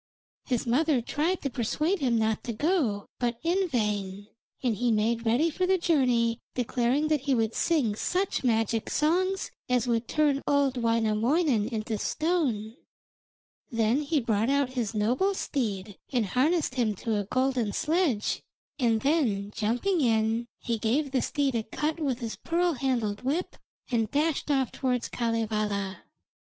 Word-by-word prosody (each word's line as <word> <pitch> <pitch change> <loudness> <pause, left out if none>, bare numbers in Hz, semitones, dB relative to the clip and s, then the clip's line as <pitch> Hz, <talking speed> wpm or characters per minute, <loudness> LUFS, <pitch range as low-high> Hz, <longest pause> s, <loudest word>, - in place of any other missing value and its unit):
His 250 -4 -1
mother 280 +3 +2
tried 310 +9 -1
to 275 - 0
persuade 300 - 0
him 250 -5 +2
not 220 -1 0
to 235 - -3
go, 255 - 0
but 240 -1 -1
in 365 +3 +1
vain, 205 -5 -2 0.3
and 240 -4 +1
he 240 +3 +1
made 225 +2 +1
ready 280 +9 +3
for 365 +4 -1
the 380 0 +3
journey, 250 -9 +2 0.2
declaring 250 +4 +1
that 305 -3 +2
he 270 -1 +1
would 225 -1 0
sing 290 -11 +1
such 365 - -1
magic 225 -2 +1
songs 370 +5 +1 0.2
as 250 -1 +2
would 235 -1 0
turn 295 -3 +2
old 285 -2 +2
Wainamoinen 230 +2 +2
into 220 -2 -3
stone. 270 - -1 0.9
Then 230 +4 +1
he 300 +1 +1
brought 225 -1 0
out 280 -1 +2
his 235 -4 -2
noble 255 - +1
steed 210 - -3
and 245 -5 +1
harnessed 275 - +1
him 230 -5 0
to 220 +2 -2
a 205 - -3
golden 255 -1 0
sledge, 305 - 0 0.4
and 230 -4 +2
then 235 -10 +1
jumping 245 - 0
in, 225 -1 +1
he 235 -2 -2
gave 265 +6 0
the 260 -2 +1
steed 280 -3 0
a 230 - 0
cut 300 +9 -3
with 270 -5 -1
his 230 -2 -4
pearl 345 +1 0
handled 240 -6 -1
whip, 295 +8 -2 0.4
and 225 -3 +1
dashed 300 +2 0
off 270 -4 +1
towards 250 -2 -1
Kalevala. 215 -4 -2
245 Hz, 155 wpm, -28 LUFS, 220-295 Hz, 0.9 s, ready